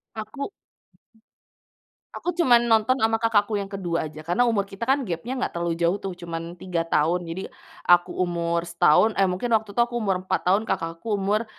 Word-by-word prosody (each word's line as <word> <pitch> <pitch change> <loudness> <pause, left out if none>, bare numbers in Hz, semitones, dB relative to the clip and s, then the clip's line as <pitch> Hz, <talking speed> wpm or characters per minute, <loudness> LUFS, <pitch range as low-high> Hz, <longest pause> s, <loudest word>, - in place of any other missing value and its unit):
Aku 220 - -5 1.7
aku 355 - -4
cuman 240 -7 +6
nonton 225 +3 +3
ama 225 +1 0
kakakku 220 -2 +2
yang 195 - -6
kedua 175 -5 -2
aja, 155 - -12
karena 175 +8 +1
umur 200 -4 +1
kita 195 +2 -14
kan 270 -1 +2
gapnya 200 +8 -4
nggak - - -2
terlalu 170 -1 -1
jauh 170 +3 +1
tuh, 195 -1 -4
cuman 165 -1 -5 0.2
3 175 -2 -2
tahun. 165 +2 +1
Jadi 175 +3 -4 0.4
aku 175 0 +5
umur 170 -1 -1
setahun, 170 +5 +4
eh 195 - +4
mungkin 225 +6 -2
waktu 220 -1 +1
itu 235 - +5
aku 240 - -14
umur 195 -3 +1
4 - - 0
tahun, 195 +4 +3
kakakku 165 +3 -4
umur 210 +4 0
195 Hz, 180 wpm, -24 LUFS, 170-225 Hz, 1.7 s, cuman